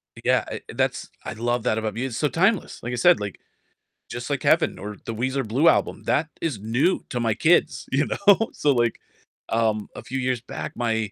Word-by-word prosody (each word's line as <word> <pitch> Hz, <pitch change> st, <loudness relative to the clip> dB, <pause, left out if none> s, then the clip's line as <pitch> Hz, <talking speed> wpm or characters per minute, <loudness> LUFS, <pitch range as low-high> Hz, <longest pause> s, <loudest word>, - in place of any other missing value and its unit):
Y -, -, -12 dB
yeah, -, -, +3 dB
I -, -, -6 dB
that's -, -, -1 dB, 0.2 s
I 110 Hz, -, -4 dB
love 120 Hz, +1 st, -1 dB
that 110 Hz, -, +1 dB
about 110 Hz, -2 st, -2 dB
mus 120 Hz, -, -2 dB
it's 115 Hz, -, -4 dB
so 150 Hz, -, +2 dB
timeless. 195 Hz, +7 st, +1 dB
Like 120 Hz, -, -3 dB
I -, -, 0 dB
said, 175 Hz, +7 st, +5 dB
like, 100 Hz, -2 st, -5 dB, 0.7 s
Just -, -, -6 dB
Like -, -, -2 dB
Heaven -, -, +3 dB
or 105 Hz, +1 st, -6 dB
the 115 Hz, -, -3 dB
Weezer 130 Hz, +3 st, -1 dB
Blue 135 Hz, +10 st, +2 dB
Album, -, -, +2 dB
that 155 Hz, +2 st, +1 dB
is 150 Hz, -10 st, -2 dB
new 120 Hz, -, +1 dB
to 125 Hz, -, -2 dB
my 115 Hz, -2 st, +1 dB
kids, 130 Hz, -2 st, +2 dB
you 140 Hz, +3 st, +2 dB
know? 205 Hz, +2 st, +3 dB
So 145 Hz, -, +2 dB
like, 120 Hz, -2 st, +1 dB, 0.5 s
um, 110 Hz, -2 st, 0 dB
a -, -, -8 dB
few 130 Hz, -, -4 dB
years 125 Hz, -2 st, -1 dB
back, 125 Hz, -, -6 dB
my, 110 Hz, -3 st, -1 dB
120 Hz, 215 wpm, -24 LUFS, 110-145 Hz, 0.7 s, said